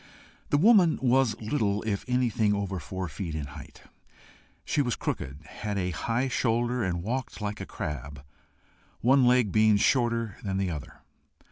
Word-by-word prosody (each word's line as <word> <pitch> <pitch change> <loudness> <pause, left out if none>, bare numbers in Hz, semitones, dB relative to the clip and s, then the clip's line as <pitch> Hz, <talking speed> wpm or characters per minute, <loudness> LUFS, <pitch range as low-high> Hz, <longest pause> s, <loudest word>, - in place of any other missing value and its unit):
The 145 - +3
woman 185 -2 +5
was 130 -3 +2
little 105 -3 -1
if 105 -3 -2
anything 115 -4 +1
over 100 -2 -3
four 95 +4 -5
feet 80 +1 -5
in 75 -2 -3
height. 70 - -12 0.8
She 145 - +1
was 125 -4 0
crooked, 70 +4 -4
had 105 +4 -5
a 90 -1 -1
high 115 - -1
shoulder, 120 -1 0
and 85 -2 -2
walked 125 +4 -3
like 105 -1 -4
a - - -6
crab, 70 -1 -6 0.8
one 130 +2 +5
leg 125 -5 +4
being 110 0 +4
shorter 115 -2 +1
than 95 -2 -2
the 95 -2 0
other. 75 -4 -8
110 Hz, 155 wpm, -28 LUFS, 95-125 Hz, 0.8 s, woman